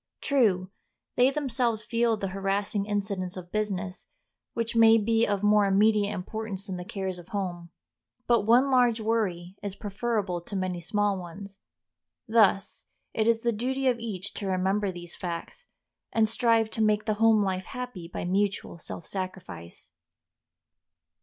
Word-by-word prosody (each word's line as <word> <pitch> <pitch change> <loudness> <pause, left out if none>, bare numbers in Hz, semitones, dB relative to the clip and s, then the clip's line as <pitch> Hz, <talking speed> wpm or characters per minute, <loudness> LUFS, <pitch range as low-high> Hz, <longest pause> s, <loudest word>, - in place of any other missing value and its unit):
True, 200 -9 +2 0.4
they 250 +1 +5
themselves 250 -6 -1
feel 230 -1 +1
the 195 -2 -3
harassing 195 +1 -1
incidents 200 -3 -2
of 180 -1 -9
business, 195 -3 -3 0.5
which 230 0 -2
may 225 0 +7
be 225 +1 +2
of 205 -1 -1
more 210 -1 +5
immediate 205 +1 +3
importance 200 +1 -5
than 190 -3 -5
the 180 - -5
cares 190 -1 -4
of 175 - -13
home. 175 -4 -4 0.6
But 235 -1 +4
one 245 +6 +4
large 245 -3 +4
worry 200 -5 -1
is 200 -1 -4
preferable 205 -3 -2
to 200 - -8
many 185 -2 -2
small 205 +2 0
ones. 195 +3 -9 0.7
Thus 215 -3 +3 0.3
it 220 0 +1
is 230 -1 +3
the 235 - +1
duty 260 +5 -2
of 245 -2 +2
each 210 -4 -5
to 200 - -5
remember 190 +2 +1
these 175 -1 -8
facts, 175 - -6 0.4
and 220 -1 +3
strive 225 -1 +2
to 225 - -2
make 215 0 +2
the 215 - +1
home 220 -2 +5
life 190 -1 -2
happy 250 -9 -6
by 175 - -5
mutual 195 -1 -1
self 170 0 -8
sacrifice. 185 - -7
205 Hz, 155 wpm, -27 LUFS, 185-225 Hz, 0.7 s, may